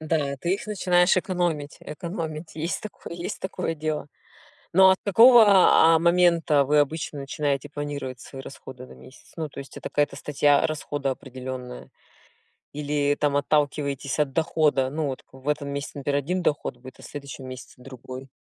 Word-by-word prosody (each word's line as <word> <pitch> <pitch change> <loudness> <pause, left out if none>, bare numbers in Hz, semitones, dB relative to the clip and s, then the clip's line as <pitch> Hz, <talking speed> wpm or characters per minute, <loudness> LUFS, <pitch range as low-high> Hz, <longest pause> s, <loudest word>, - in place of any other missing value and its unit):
Да, 150 -3 -1
ты 175 +6 0
их 200 - -7
начинаешь 180 -3 +3
экономить 175 -6 -1
экономить. 160 0 -6
Есть 160 +3 -3
такое 210 -4 -9
есть 175 0 -5
такое 185 -3 -3
дело. 155 -1 -3 0.6
Но 190 +2 +7
от 190 - +3
какого, 230 +4 +8
а, 180 -4 +6
момента 170 -3 +3
вы 150 +2 +2
обычно 150 0 -2
начинаете 140 0 -2
планировать 145 -4 -5
свои 135 0 -10
расходы 130 -2 -10
на - - -14
месяц? 130 - -16
Ну, 160 -2 -3
то 140 - -13
есть, 135 - -12
это - - -6
какая-то 145 0 0
статья 145 0 +2
расхода 145 -2 -3
определённая? 130 -1 -8 0.8
Или 145 0 0
там 145 -1 +1
отталкиваетесь 145 -1 0
от 145 -2 +1
дохода? 150 -3 +1
Ну, 155 0 -2
вот 130 -2 -5
в 130 +1 -14
этом 145 -1 -1
месяце, 140 +1 -5
например, 140 0 0
1 180 +6 -2
доход 145 -5 -1
будет, 130 +1 -13
а - - -13
в - - -11
следующем 140 -2 -8
месяце 130 0 -9
другой. 130 +1 -10
145 Hz, 165 wpm, -25 LUFS, 140-165 Hz, 0.8 s, какого